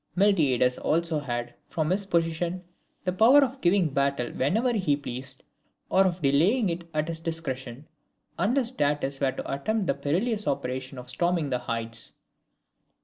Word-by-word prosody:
Miltiades 145 - +3
also 165 -1 +1
had, 120 -3 -4 0.2
from 155 0 -1
his 195 +1 0
position, 170 +1 0 0.4
the 180 - -1
power 245 +9 +6
of 265 0 -3
giving 180 -1 +3
battle 140 -3 0
whenever 220 - +1
he 180 -10 +1
pleased, 130 -1 -5 0.5
or 190 +1 +5
of 175 -2 -3
delaying 180 - +3
it 170 0 -5
at 155 0 -1
his 165 -1 -3
discretion, 145 -5 -5 0.5
unless 245 +1 +2
Datis 145 - 0
were 135 -1 +2
to - - -5
attempt 210 +10 -1
the - - +2
perilous 205 +8 -1
operation 130 -1 -3
of 125 0 -8
storming 170 0 0
the 125 - +1
heights. 115 -1 -3
160 Hz, 150 wpm, -27 LUFS, 135-185 Hz, 0.5 s, power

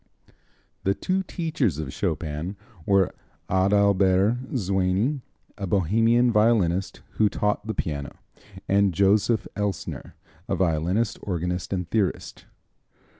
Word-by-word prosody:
The 100 +1 +1
two 185 - -1
teachers 160 - -1
of 75 -4 -5
Chopin 80 0 -3 0.3
were 100 -2 +3 0.4
Adalbert 100 +4 +3
Zwyny, 95 +7 0 0.4
a 100 - -3
Bohemian 115 +7 +3
violinist, 105 -5 +2 0.2
who 105 -1 +5
taught 105 +1 -1
the 110 - -3
piano, 70 -5 -4 0.5
and 100 -2 +3
Joseph 105 +4 +2
Elsner, 100 -5 -4 0.4
a - - +1
violinist, 90 +5 0
organist 90 -1 -3
and 90 -3 -2
theorist. 100 -1 -2
100 Hz, 105 wpm, -25 LUFS, 90-110 Hz, 0.5 s, who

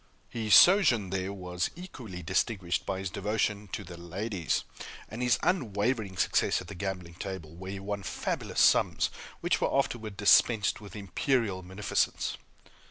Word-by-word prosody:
His 110 -3 +3
sojourn 140 - +6
there 95 0 -2
was 90 -2 -3
equally 125 - -8
distinguished 95 -2 -1
by 95 - -1
his 95 -1 -4
devotion 105 0 -1
to - - -3
the 85 - -10
ladies, 90 +1 -2 0.4
and 110 +3 -7
his 125 -2 +3
unwavering 110 - 0
success - - +2
at - - -9
the - - -6
gaming 90 -2 -5
table, 85 -3 -7
where 95 +3 -7
he 100 - -5
won 100 +1 -4
fabulous - - -3
sums, - - +4 0.3
which - - +1
were - - +1
afterward 110 -7 -1
dispensed 105 +1 +4
with 100 -1 -11
imperial 100 0 0
munificence. 95 +3 -1
100 Hz, 150 wpm, -29 LUFS, 95-110 Hz, 0.4 s, sojourn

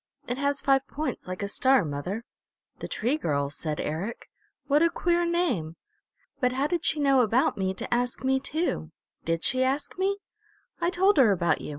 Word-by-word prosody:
It 245 +2 -3
has 280 0 0
five 270 0 +2
points 305 -8 -4
like 185 +2 -4
a - - -1
star, 260 +1 +3
mother." 170 +10 -4 0.5
"The - - -5
Tree 250 +7 0
Girl," 140 - -1
said 150 +1 -4
Eric. 175 +10 -4 0.3
"What 295 +1 +3
a 335 - +5
queer 345 0 +1
name! 340 - 0 0.6
But 250 -2 +2
how 270 +2 0
did 345 +2 -1
she 315 - +1
know 275 -2 +4
about 240 +3 +2
me 190 -1 -1
to - - -3
ask 245 +1 -1
me 265 0 +2
too? 280 - -2 0.4
Did 165 0 -1
she 255 0 +2
ask 275 +7 -2
me?" 395 +1 +1 0.6
"I 340 - +2
told 380 +1 +3
her 250 -7 +6
about 175 -3 +1
you. - - -6
260 Hz, 190 wpm, -27 LUFS, 190-300 Hz, 0.6 s, her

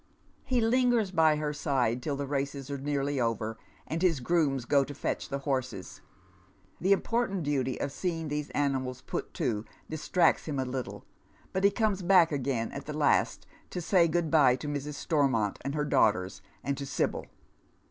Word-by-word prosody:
He 250 -2 +1
lingers 235 -3 +2
by 160 -3 +4
her 150 0 -2
side 130 -5 0
till 145 +2 -2
the 140 0 -3
races 140 0 -3
are 140 - -3
nearly 140 0 -1
over, 115 -1 -1 0.3
and 165 +1 -3
his 170 -6 +3
grooms 140 -3 +1
go 140 +2 +4
to 145 +1 -8
fetch - - -3
the 140 - -2
horses. 135 -2 -3 0.8
The 190 +3 +1
important 200 -2 +1
duty 135 -3 -1
of 140 - -2
seeing 165 0 -3
these 150 0 -3
animals 130 -3 -1
put - - -4
to 105 -3 -1 0.2
distracts 160 +3 +2
him 150 -3 -3
a 130 - 0
little, 130 -1 -5 0.5
but 190 - -1
he 200 - +7
comes 205 -2 0
back 175 -2 +5
again 130 -5 -1
at 140 +1 -7
the 150 0 -4
last 150 - +2 0.2
to - - -4
say 175 0 +3
good 165 -1 0
bye 140 -6 +6
to 150 - -7
Mrs. 145 0 -3
Stormont 135 -10 +1
and 140 +1 -3
her 150 -1 0
daughters 100 -9 +2 0.2
and 140 - -1
to 140 - -4
Sibyl. 135 - -1
145 Hz, 180 wpm, -29 LUFS, 135-165 Hz, 0.8 s, he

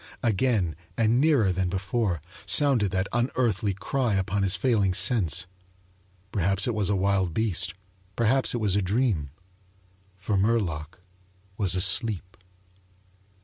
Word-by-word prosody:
Again, 110 -6 +1 0.2
and 115 +2 +2
nearer 140 -11 +3
than 90 0 -1
before, 95 -3 -2 0.2
sounded 135 -9 +3
that 95 +1 -1
unearthly 120 -5 0
cry 120 +2 -1
upon 95 +1 -1
his 95 -1 +2
failing 100 -3 +1
sense. 90 - +2 0.9
Perhaps 95 0 0
it 120 - -1
was 105 -3 -1
a 100 - +1
wild 95 -3 0
beast; 100 -5 0 0.4
perhaps 125 +3 +1
it - - -1
was 105 -4 +1
a 100 - +2
dream. 100 - 0 0.9
For 100 +2 -2
Murlock 95 -7 -1 0.6
was 95 -3 +1
asleep. 95 0 +1
100 Hz, 125 wpm, -26 LUFS, 95-115 Hz, 0.9 s, nearer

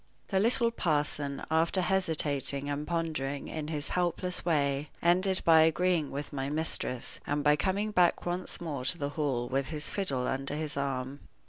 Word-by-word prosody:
The 190 - +2
little 230 +2 +3
parson, 145 -7 -1
after 165 +4 +2
hesitating 150 -6 0
and 145 +1 -3
pondering 155 -5 -2
in 155 -2 -4
his 150 -2 -3
helpless 180 0 -1
way, 145 -3 +1
ended 185 +2 +3
by 160 -1 +7
agreeing 160 -1 +2
with 145 +2 -6
my 135 -1 -2
mistress, 150 -5 -2
and 145 0 0
by 150 0 +5
coming 195 +7 0
back 180 -4 +3
once 175 +1 -2
more 150 -7 -4
to 170 - +1
the 145 -3 -2
Hall 140 -5 -1
with 135 +1 -1
his 150 -2 -3
fiddle 135 -11 -1
under 135 +2 -2
his 155 -1 -3
arm. 135 0 -3
150 Hz, 165 wpm, -30 LUFS, 140-175 Hz, -, by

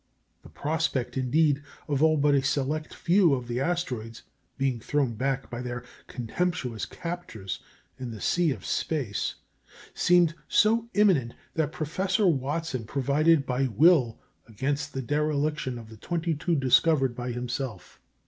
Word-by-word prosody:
The - - -14
prospect, 155 -4 -1
indeed, 145 +3 +2 0.3
of 145 -1 0
all 155 0 +5
but 145 0 +3
a 140 - +4
select 145 +2 -1
few 175 -4 +3
of 125 -2 -6
the 120 +1 -2
asteroids 130 -9 -2 0.3
being 135 -3 0
thrown 135 +1 0
back 135 +4 -1
by 120 0 -4
their 120 -1 -5 0.2
contemptuous 125 - -2
captors 170 - -6 0.4
into 120 -3 -5
the - - -9
sea 175 - +2
of 120 -9 -4
space 130 -11 -1 0.6
seemed 175 -2 +4
so 230 +2 +3
imminent 180 - +3 0.2
that 155 -2 0
Professor 185 +5 0
Watson 145 -4 0
provided 140 +4 +2
by 130 +1 0
will 130 - +4 0.3
against 130 +6 -2
the 135 - -2
dereliction 150 -1 0
of 115 -2 -10
the 110 - -12
twenty 170 - -2
two 165 +3 0
discovered 135 0 +3
by 125 0 -4
himself. 120 -3 -5
140 Hz, 140 wpm, -27 LUFS, 125-160 Hz, 0.6 s, all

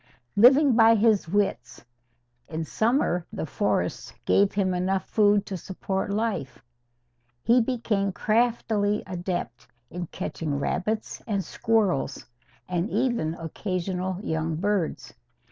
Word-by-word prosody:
Living 265 +4 +6
by 225 0 +6
his 215 -4 +3
wits, 205 -7 -1 0.6
in 160 +1 -4
summer 220 - +1
the - - -4
forests - - -2
gave 200 0 +4
him 190 -2 +1
enough 190 +2 0
food 205 -1 +3
to 195 - -5
support 190 +2 -4
life. 190 - -2 0.8
He 240 +2 +4
became 225 -5 -1
craftily 215 -1 +1
adept 175 -9 -4 0.2
in 175 0 -5
catching 150 -1 -4
rabbits 210 +9 -2
and 200 -3 -1
squirrels, 205 -11 0 0.4
and 180 +3 -1
even 235 -14 0
occasional 185 +2 -3
young 160 0 -1
birds. 195 0 -2
195 Hz, 110 wpm, -26 LUFS, 175-220 Hz, 0.8 s, Living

